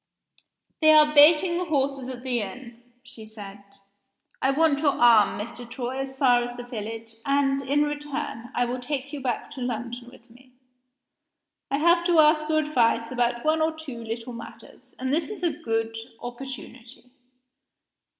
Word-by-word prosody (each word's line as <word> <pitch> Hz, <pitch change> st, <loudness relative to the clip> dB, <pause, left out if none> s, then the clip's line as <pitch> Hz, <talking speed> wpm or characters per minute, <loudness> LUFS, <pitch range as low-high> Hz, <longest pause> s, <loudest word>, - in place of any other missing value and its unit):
"They 310 Hz, -1 st, +6 dB
are 300 Hz, -1 st, +6 dB
baiting 320 Hz, +4 st, +6 dB
the 360 Hz, -, -2 dB
horses 275 Hz, -4 st, -1 dB
at 250 Hz, -1 st, -7 dB
the 250 Hz, -2 st, 0 dB
inn," 235 Hz, +4 st, -8 dB, 0.2 s
she 230 Hz, -3 st, -11 dB
said. 205 Hz, -2 st, -11 dB, 0.8 s
"I 265 Hz, -, +2 dB
want 290 Hz, 0 st, +2 dB
your 290 Hz, -2 st, +2 dB
arm, 225 Hz, -5 st, +4 dB
Mr. 235 Hz, +2 st, -6 dB
Troy, 255 Hz, +1 st, -4 dB
as 270 Hz, 0 st, -5 dB
far 250 Hz, -3 st, +4 dB
as 245 Hz, 0 st, -6 dB
the 245 Hz, -, -6 dB
village 225 Hz, -1 st, -6 dB
and, 275 Hz, -1 st, +1 dB
in 285 Hz, +2 st, +1 dB
return, 295 Hz, -5 st, -4 dB
I 245 Hz, -, +2 dB
will 245 Hz, +1 st, -3 dB
take 280 Hz, +2 st, -4 dB
you 290 Hz, -, -5 dB
back 250 Hz, -2 st, -3 dB
to 260 Hz, -, -8 dB
London 240 Hz, 0 st, -5 dB
with 245 Hz, -1 st, -18 dB
me. 255 Hz, +1 st, -20 dB, 1.2 s
I 275 Hz, -, 0 dB
have 340 Hz, +3 st, +4 dB
to 345 Hz, -2 st, +3 dB
ask 305 Hz, 0 st, +4 dB
your 310 Hz, -, +2 dB
advice 240 Hz, -6 st, +1 dB
about 240 Hz, 0 st, -1 dB
one 315 Hz, +1 st, +2 dB
or 315 Hz, 0 st, 0 dB
two 265 Hz, -7 st, -8 dB
little 230 Hz, +2 st, -6 dB
matters, 230 Hz, 0 st, -12 dB
and 260 Hz, +1 st, -2 dB
this 320 Hz, +3 st, 0 dB
is 410 Hz, -5 st, -8 dB
a 340 Hz, -, +2 dB
good 225 Hz, 0 st, -2 dB, 0.2 s
opportunity." 250 Hz, 0 st, -10 dB
260 Hz, 170 wpm, -25 LUFS, 240-295 Hz, 1.2 s, They